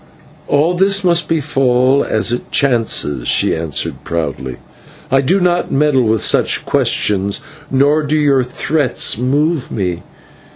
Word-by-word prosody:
"All 155 +5 +2
this 195 +2 +2
must 170 -3 +1
befall 135 -3 +1
as 110 +2 0
it 120 - -5
chances," 115 - 0
she - - +2
answered 80 -4 -3
proudly, 70 -6 -4 0.5
"I 135 0 +3
do 180 +9 +1
not 175 -1 0
meddle 145 -1 +2
with 110 -2 0
such - - +1
questions, 100 -1 0 0.3
nor 145 +3 +2
do 150 +1 -1
your 140 -3 +2
threats 130 -1 -1
move 145 +4 0
me. 90 -5 -3
135 Hz, 130 wpm, -15 LUFS, 110-155 Hz, 0.5 s, I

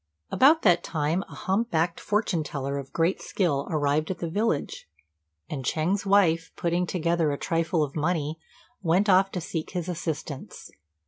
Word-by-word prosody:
About 305 +5 +5
that 180 -5 +4
time 160 +3 -1
a - - -10
hump 210 +5 0
backed 165 +1 0
fortune 210 -6 0
teller 140 -1 -3
of 135 -1 -9
great 170 +3 +1
skill 150 -8 0
arrived 150 0 +1
at 190 - -2
the 170 -2 -4
village, 205 -5 -1 0.6
and 135 -3 -5
Ch'êng's 180 +10 0
wife, 165 -5 +3
putting 175 +1 0
together 170 -3 +1
a 140 - -2
trifle 165 +1 0
of 140 -2 -5
money, 160 -1 -1 0.4
went 185 +3 +2
off 190 +1 +5
to 180 - -1
seek 165 -1 -5
his 175 -2 -3
assistance. 160 -5 -5
165 Hz, 165 wpm, -26 LUFS, 155-185 Hz, 0.6 s, About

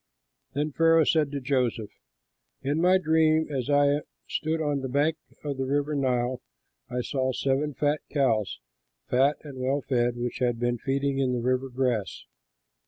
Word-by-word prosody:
Then 150 +2 -1
Pharaoh 165 +2 +4
said 155 -1 +2
to 145 - -3
Joseph, 125 -5 -1 0.7
"In 145 +4 0
my 180 +2 +5
dream 160 -2 +3
as 130 0 -2
I 145 0 +3 0.3
stood 160 +1 -1
on 145 -3 0
the 130 - -4
bank 145 +5 +1 0.3
of 145 -2 -3
the 140 +3 0
Nile, 125 -2 0 0.5
I 125 - -2
saw 130 +1 -1
seven 140 +2 -1 0.3
cows, 115 - +1 0.5
fat 135 +4 +3
and 140 -4 -9
well 135 +3 0
fed, 120 -2 0
which 120 0 -3
had 120 -2 +1
been 120 0 0
feeding 135 +1 -1
in 130 -2 +1
the 125 - 0
river 130 +2 0
grass. 125 -6 -2
135 Hz, 155 wpm, -27 LUFS, 125-150 Hz, 0.7 s, my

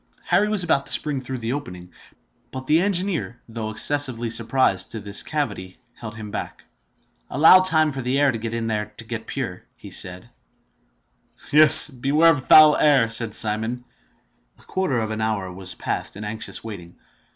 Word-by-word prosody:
Harry 180 +5 +1
was 210 -4 +1
about 140 -5 0
to - - -4
spring 145 -3 0
through 130 0 -6
the 120 +1 -4
opening; 90 -11 -8 0.6
but 130 +1 -8
the 155 +4 +2
engineer, 180 - -2
though 110 -1 -6
excessively 120 0 -1
surprised 115 -5 +1
to 115 - -7
find 105 - -10
this 100 0 +2
cavity, 100 -11 -5 0.2
held 110 -2 -10
him 110 -2 -9
back. - - -7 0.6
"Allow 160 +6 +6
time 160 -4 +1
for 135 -1 -6
the 130 +3 -1
air 145 -1 +3
in 115 0 -5
there 105 -1 -3
to - - -7
get - - -8
pure," - - -5 0.3
said 90 +6 -4 1.2
he. 150 - +1
"Yes! 155 -1 +9
beware 150 +4 +2
of 145 -4 -2
the - - -20
foul 155 -1 +7
air!" 135 -6 +2
said 115 -2 -3
Simon. 110 +3 -2 0.7
A - - -22
quarter 185 -9 -2
of 110 -1 -3
an 110 0 -4
hour 100 -4 -3
was 95 0 -7
passed - - -4
in 105 - -8
anxious 110 +1 -3
waiting. 90 -6 -10
120 Hz, 175 wpm, -22 LUFS, 110-145 Hz, 1.2 s, Yes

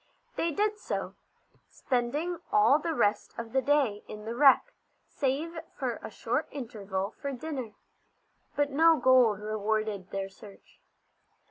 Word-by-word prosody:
They 335 - 0
did 420 +5 0
so, - - -4 0.6
spending 290 +8 -2
all 240 +8 +5
the 325 +1 -2
rest 205 -6 +1
of 230 -1 -6
the 265 - +3
day 270 -8 +1
in 210 0 -9
the 230 - -3
wreck, 280 - +5 0.3
save 300 +5 -2 0.2
for - - -2
a - - -7
short - - -2
interval 205 -7 -4
for 280 - -2
dinner. 260 -5 -5 0.8
But 290 0 +1
no 325 +3 +5
gold 250 -7 +5
rewarded 215 -2 -2
their 195 0 -3
search. 195 +1 -16
255 Hz, 135 wpm, -29 LUFS, 210-295 Hz, 0.8 s, all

